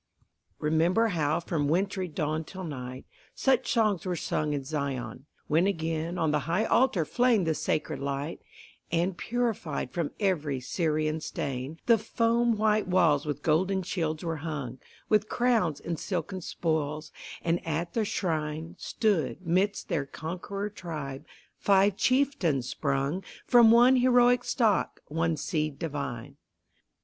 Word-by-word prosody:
Remember 170 +9 +2
how 155 -5 +1
from 160 -4 -1
wintry 190 +4 0
dawn 155 -1 -2
till 185 +4 -8
night, 130 -5 -6 0.3
Such 260 -2 +2
songs 215 -6 +2
were 180 -2 -2
sung 150 -2 -1
in 140 -2 -2
Zion, 135 -3 -4 0.2
when 165 +5 +3
again 165 -1 -2
On 160 -3 +1
the 150 - +2
high 190 +7 +2
altar 225 -12 +3
flamed 240 -1 +2
the 160 - +2
sacred 155 - -2
light, 140 +3 -3 0.5
And, 170 +2 +1
purified 215 - -2
from 170 -1 -1
every 155 -9 0
Syrian 155 +2 -1
stain, 135 +2 -4
The 230 -2 +5
foam 230 +1 +1
white 215 -1 +2
walls 165 -6 +3
with 145 -1 -3
golden 185 +5 +2
shields 160 -3 -2
were 165 -1 -2
hung, 145 -5 -5 0.3
With 215 0 +2
crowns 225 - +1
and 170 -2 -4
silken 185 0 -3
spoils, 155 -2 -2 0.3
and 170 +1 0
at 165 +1 -2
the 225 - +1
shrine, 160 -4 -2
Stood, 180 - 0
midst 190 +5 +1
their 150 -7 -1
conqueror 185 +7 -5
tribe, 150 -9 -6 0.3
five 200 0 +4
chieftains 255 - +1
sprung 140 +7 -1 0.2
From 240 -2 +7
one 240 +3 +7
heroic 245 0 +4
stock, 220 -6 +1
one 165 +1 0
seed 155 -3 -2
divine. 140 -4 -5
165 Hz, 140 wpm, -28 LUFS, 150-200 Hz, 0.5 s, From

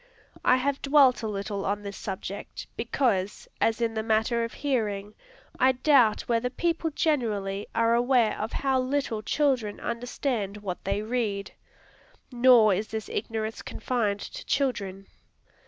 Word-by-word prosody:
I 255 - +5
have 275 +2 -1
dwelt 275 -3 +5
a 220 - -2
little 200 -1 -3
on 205 +1 -2
this 200 -1 -6
subject, 195 0 -6
because, 215 -6 -1
as 225 +1 +2
in 230 -1 +1
the 220 - -1
matter 220 +2 +1
of 230 - -4
hearing, 210 -7 -2 0.5
I 260 +1 +5
doubt 255 -4 +4
whether 235 +1 0
people 330 +4 -1
generally 215 -11 -1
are 230 0 +3
aware 240 -3 +2
how 265 -1 +1
little 255 -4 -1
children 255 -5 0
understand 235 -3 -3
what 195 -4 -6
they 200 +2 -1
read. 215 -4 -2 0.8
Nor 240 -4 +6
is 210 +4 -2
this 220 -1 -5
ignorance 220 0 -3
confined 215 -4 -2
to - - -7
children. 200 -9 -1
225 Hz, 140 wpm, -27 LUFS, 205-255 Hz, 0.8 s, Nor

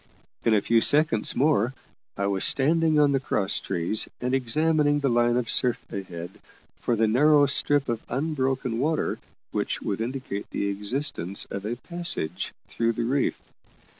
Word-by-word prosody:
In 115 - +3
a 105 - +3
few 115 +2 +3
seconds 145 -7 +3
more 130 -4 +2 0.4
I 100 - -1
was 100 -1 0
standing 160 +3 +2
on 145 -1 +4
the 135 - +2
cross 100 -7 -1
trees 90 +3 -1
and 125 +1 -2
examining 145 +3 +2
the 140 -1 +1
line 120 0 +3
of 125 -2 -1
surf 125 0 0
ahead 90 -3 -6 0.4
for 120 - -1
the 115 0 +2
narrow 145 +6 +5
strip 145 0 +2
of 115 -2 -2
unbroken 130 -3 -1
water 155 +4 0 0.3
which - - -2
would 100 +2 -2
indicate 120 -4 -4
the 100 - -2
existence 100 - -2
of 100 +1 -4
a 120 - -2
passage 170 - -3 0.2
through 115 0 0
the 120 - -2
reef. 135 +3 -1
125 Hz, 160 wpm, -25 LUFS, 110-145 Hz, 0.4 s, narrow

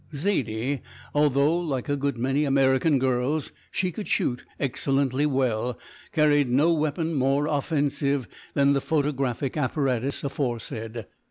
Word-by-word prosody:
Zaidie, 140 - -1 0.3
although 145 +1 +3
like 140 -8 -2
a 145 - +1
good 140 -2 -1
many 135 +5 +1
American 135 +1 +3
girls 130 +3 0 0.2
she 185 -1 -1
could 205 +5 -6
shoot 125 -1 0 0.2
excellently 135 +1 +1
well, 125 -4 0 0.3
carried 145 -4 +3
no 150 +7 +4
weapon 160 +1 -1
more 135 +1 +2
offensive 145 -3 0 0.3
than 140 0 +4
the 140 - +1
photographic 140 -4 -1
apparatus 135 -2 -1
aforesaid. 120 -5 -3
140 Hz, 120 wpm, -26 LUFS, 130-150 Hz, 0.3 s, no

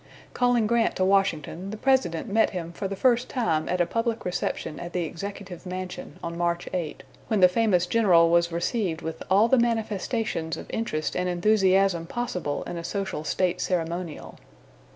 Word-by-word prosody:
Calling 245 -3 +2
Grant 235 +1 +2
to 185 - +1
Washington, 190 -2 +1
the 215 - -5
President 255 -10 +1
met 220 +2 +3
him 170 -3 -5
for 195 +3 -4
the 195 - -4
first 245 +3 +2
time 165 - 0
at 180 - 0
a 175 - +4
public 230 +3 -2
reception 175 -3 -3
at 175 0 -7
the 180 - 0
Executive 190 +2 -7
Mansion 185 -3 -6
on 170 0 -4
March 170 0 0
8, 165 -6 -3 0.2
when 215 -3 +1
the 180 - +8
famous 180 -2 +2
general 175 -5 +4
was 170 0 +3
received 170 0 -1
with 160 0 -5
all 200 +4 +5
the 260 +1 +4
manifestations 225 -6 -1
of - - -8
interest 155 -9 -2
and 180 0 0
enthusiasm 190 -2 +3
possible 180 -10 -3
in 175 - -6
a 170 - -5
social 195 -4 -3
state 180 +3 0
ceremonial. 170 -2 -3
185 Hz, 175 wpm, -26 LUFS, 170-220 Hz, 0.2 s, the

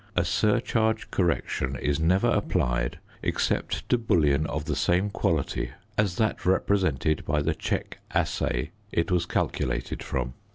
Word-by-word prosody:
A 85 - +2
surcharge 110 +3 +1
correction 85 -7 0
is 70 +2 0
never 95 +8 +3
applied 70 - 0 0.2
except - - -1
to 125 - +3
bullion 75 -9 +2
of 75 0 -3
the 75 -1 -1
same 90 +8 +2
quality - - -1 0.2
as 100 -4 +1
that 110 +2 0
represented 90 -6 +2
by 75 0 0
the 80 +2 +1
"check - - -3
assay" - - 0 0.2
it 85 +2 0
was 90 -1 +2
calculated 65 -6 -1
from. 65 -2 -2
85 Hz, 135 wpm, -27 LUFS, 70-100 Hz, 0.2 s, never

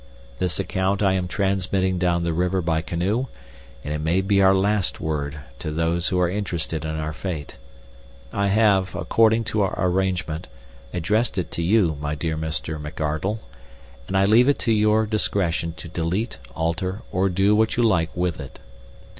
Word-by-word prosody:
This 90 -3 -1
account 95 +2 0
I 95 -1 +4
am 90 -1 -1
transmitting 95 -1 0
down 85 -1 +1
the 85 -1 0
river 90 +3 +1
by 80 -1 +1
canoe, 95 +10 -1 0.6
and 75 - -3
it 75 - -2
may 85 +5 +2
be 100 +1 +2
our 95 0 +6
last 100 0 +1
word 75 -2 -3 0.2
to - - -4
those 85 +2 0
who 90 - +1
are 90 - +3
interested 85 -4 -3
in 80 0 -3
our 80 0 -3
fate. 75 -6 -5 0.8
I 100 0 +1
have, 100 -3 +3
according 115 0 +3
to 110 -1 -1
our 95 - 0
arrangement, 90 -3 -1 0.4
addressed 105 +7 0
it 90 -4 -2
to - - -3
you, 85 -3 +3
my 75 0 -2
dear 80 +1 -2
Mr. 80 0 -3
McArdle, 75 +7 -2 0.7
and 95 - 0
I 95 - +4
leave 115 +6 +5
it 145 - +3
to 115 - +1
your 110 +1 +3
discretion 90 -6 0
to 80 - -8
delete, 90 +7 -2 0.2
alter, 90 +6 -2
or 95 +2 +1
do 95 +3 +3
what 110 +1 +2
you 120 - +3
like 85 -8 +3
with 90 -3 -1
it. 70 -4 -9
90 Hz, 175 wpm, -23 LUFS, 80-100 Hz, 0.8 s, our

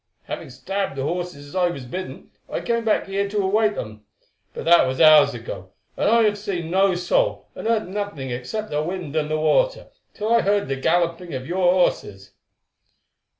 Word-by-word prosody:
Having - - -7
stabled 185 +7 -3
the 135 - -2
horses 170 -2 -4
as - - -12
I 180 -1 +3
was 140 -7 -6
bidden, 185 +9 -7 0.2
I - - -3
came 235 -1 -1
back 220 - +1
here 200 +1 -2
to 210 - -4
await 210 +2 +2
them. 105 -1 -7 0.5
But - - -7
that 170 +1 +6
was 130 0 -3
hours 150 -4 +7
ago, 95 -5 -8 0.2
and - - +1
I 230 +1 +5
have 205 -1 +1
seen 180 -5 -4
no 190 0 +3
soul, - - 0
and - - -6
heard 225 -3 +1
nothing 190 -9 -4
except 130 - -5
the 150 0 0
wind 170 -2 -5
and 155 -1 0
the 155 - 0
water, - - +1 0.3
till 215 +2 0
I 235 - +5
heard 200 +1 +1
the 135 - 0
galloping 170 +2 0
of 130 0 -5
your 180 +2 +2
horses." 100 - 0
180 Hz, 195 wpm, -22 LUFS, 145-205 Hz, 0.5 s, hours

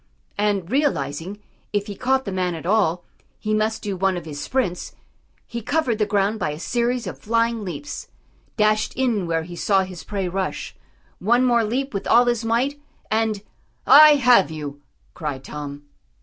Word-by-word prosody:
And 205 -3 0
realising, 190 - -1 0.4
if 205 -1 0
he 205 - -6
caught 265 +4 +1
the 200 - -3
man 180 -2 -1
at 160 - -8
all, 180 -4 +2 0.3
he 215 - -2
must 215 +1 0
do 205 -2 -2
one 190 0 +1
of 175 - -7
his 145 -2 -6
sprints, 225 -10 -2 0.5
he 235 - -6
covered 245 -2 0
the 210 - +2
ground 205 +1 +1
by - - -1
a 150 +1 -5
series 240 +4 -1
of 180 - -6
flying 230 0 0
leaps, 205 +10 -6 0.5
dashed 215 0 +2
in 235 -8 0
where 165 -1 0
he 175 +1 -9
saw 195 +2 +2
his 185 -2 -8
prey 195 -3 -3
rush; 190 +1 -3 0.4
one 240 +6 +3
more 240 -2 +3
leap 255 +5 -2
with 200 - -3
all 240 +1 +6
his 240 -1 0
might, 255 +6 0 0.3
and 220 -2 0 0.4
"I 300 +3 +9
have 250 - +5
you!" 145 -2 -7 0.3
cried 145 -4 -5
Tom. 145 -1 -7
210 Hz, 175 wpm, -22 LUFS, 180-240 Hz, 0.5 s, I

